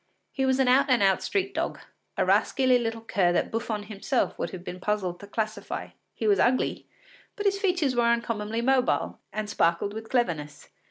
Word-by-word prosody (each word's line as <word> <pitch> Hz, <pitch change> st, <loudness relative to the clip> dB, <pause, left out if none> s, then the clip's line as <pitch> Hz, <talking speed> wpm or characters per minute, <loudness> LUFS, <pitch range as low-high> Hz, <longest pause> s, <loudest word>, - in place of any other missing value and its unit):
He 265 Hz, -1 st, 0 dB
was 260 Hz, 0 st, +3 dB
an 265 Hz, -1 st, +2 dB
out 265 Hz, +3 st, +4 dB
and 250 Hz, -5 st, +4 dB
out 195 Hz, -1 st, +3 dB
street 390 Hz, -1 st, -1 dB
dog, -, -, -2 dB, 0.4 s
a -, -, +2 dB
rascally 255 Hz, -2 st, +3 dB
little 225 Hz, -1 st, -3 dB
cur 190 Hz, -5 st, +1 dB
that -, -, 0 dB
Buffon 225 Hz, -2 st, -2 dB
himself 215 Hz, +5 st, -2 dB
would -, -, -2 dB
have 180 Hz, -2 st, -8 dB
been 180 Hz, 0 st, -7 dB
puzzled 185 Hz, -3 st, -2 dB
to 205 Hz, -, -11 dB
classify. 215 Hz, +1 st, -4 dB, 0.3 s
He -, -, -4 dB
was 410 Hz, -2 st, +4 dB
ugly, 255 Hz, +1 st, +1 dB, 0.5 s
but 410 Hz, -, -5 dB
his 395 Hz, 0 st, +2 dB
features 355 Hz, -9 st, +1 dB
were 240 Hz, -1 st, +3 dB
uncommonly 230 Hz, -1 st, -1 dB
mobile 260 Hz, 0 st, +1 dB
and 215 Hz, -1 st, -3 dB
sparkled 170 Hz, 0 st, +1 dB
with 220 Hz, +1 st, -7 dB
cleverness. 155 Hz, -, -2 dB
225 Hz, 185 wpm, -27 LUFS, 205-260 Hz, 0.5 s, out